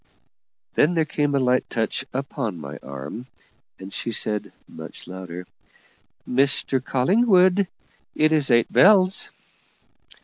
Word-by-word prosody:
Then 170 +4 +2
there 160 -1 +2
came 145 -2 -1
a - - +3
light 125 -1 +1
touch 115 +3 -2
upon 130 - -4
my 70 -1 -8
arm, 70 - -8 0.5
and 95 +1 -10
she 115 - -3
said, 105 -1 -1 0.2
much - - -11
louder, 90 -1 -8 0.8
"Mr 135 0 +1
Collingwood, 185 - +3 0.5
it 155 0 +3
is 150 -3 +2
eight 120 -2 +2
bells." 190 -1 +5
130 Hz, 115 wpm, -23 LUFS, 105-155 Hz, 0.8 s, bells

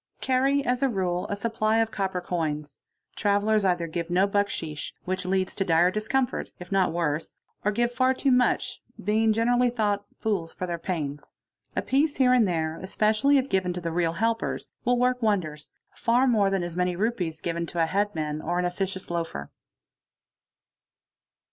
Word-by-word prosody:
ah - - -51
a - - -36
Carry, 270 +2 +2
as 250 +1 0
a 275 - +3
rule, 180 -5 -1
a 205 - -1
supply, 220 +1 0
of 225 -1 +2
copper 190 -3 -2
coins. 155 -4 -3 0.3
'Travellers 205 +1 +2
either 175 -3 +1
give 165 +1 -4
n 175 - -1 0.2
bucksheesh—which 185 -1 -2
leads 190 0 0
to 195 - -1
dire 175 0 +4
discomfort, 220 +5 -1
if 180 +1 -11
not 195 -3 +3
worse; 165 -2 -2 0.3
or 210 - +2
give 240 +3 +1
far 255 +1 +2
too 265 +1 +1
much, 250 -1 +2 0.2
being 220 +3 +3
generally 245 +3 +3
thought 210 -4 0
fools 190 -7 -2
for 185 - -3
their 170 -1 -3
pains. 150 -5 -4 0.4
A - - 0
pice 285 +3 +2
here 255 -2 +4
an 245 -3 +5
there, 160 -3 -1
especially 215 +8 +2
if 265 0 +1
given 185 -6 0
to 180 - -4
the 170 -1 -3
real 165 -1 +1
helpers, 225 +5 -1
will 245 0 +2
work 250 +1 +1
wonders, 170 -9 -1 0.2
far 245 +2 +2
mor 215 -6 +3
than 195 -2 0
as 175 -1 -5
many 180 0 0
rupees 180 -6 -1
given 170 0 -2
to 170 0 0
a - - +4
headman 160 -5 -1
or 175 +3 -1
an 180 - +1
officious 190 +1 -3
loafer. 165 - -3
195 Hz, 180 wpm, -26 LUFS, 170-230 Hz, 0.4 s, an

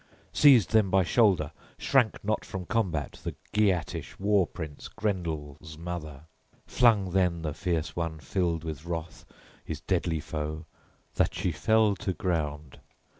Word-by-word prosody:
Seized 130 - +6
then 110 -4 +4
by 95 0 +4
shoulder, 90 -6 +3 0.3
shrank 125 -7 +2
not 110 +1 0
from 95 -2 -6
combat, 85 -11 -1
the - - -4 0.2
Geatish 95 -6 0
war 100 -2 +3
prince 80 -4 -7
Grendel's 80 -6 -4
mother. 80 -4 -6 0.4
Flung 110 -7 +3
then 90 -3 +1
the 75 -2 -2
fierce 80 -2 -2
one, 80 -2 -2
filled 85 -1 -1
with 80 -2 -5
wrath, 85 -1 -5 0.4
his - - -6
deadly 80 -2 0
foe, 75 +1 -4 0.5
that - - +2
she - - 0
fell 110 -2 +3
to 95 -4 -2
ground. 75 -6 -3
85 Hz, 135 wpm, -28 LUFS, 80-100 Hz, 0.5 s, Seized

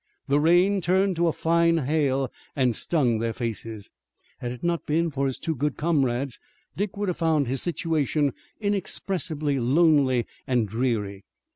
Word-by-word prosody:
The 140 +1 +3
rain 180 +5 +4
turned 190 +2 +2
to 170 0 +2
a - - +3
fine 170 +1 +2
hail 135 -3 0 0.2
and 125 -4 +2
stung 125 -8 +1
their 115 0 -1
faces. 115 -3 -5 0.5
Had 120 - -4
it 125 - -9
not 170 -1 -1
been 165 +2 +1
for 140 -1 0
his 130 - -3
two 160 - -2
good 145 0 -2
comrades 135 -5 0 0.4
Dick 200 0 -3
would 205 0 -1
have 180 - -1
found 160 -3 +2
his 130 +1 -1
situation 155 -4 0 0.3
inexpressibly 180 -8 -1
lonely 135 -2 +3 0.2
and 120 -4 +1
dreary. 105 -3 -2
145 Hz, 155 wpm, -25 LUFS, 125-170 Hz, 0.5 s, rain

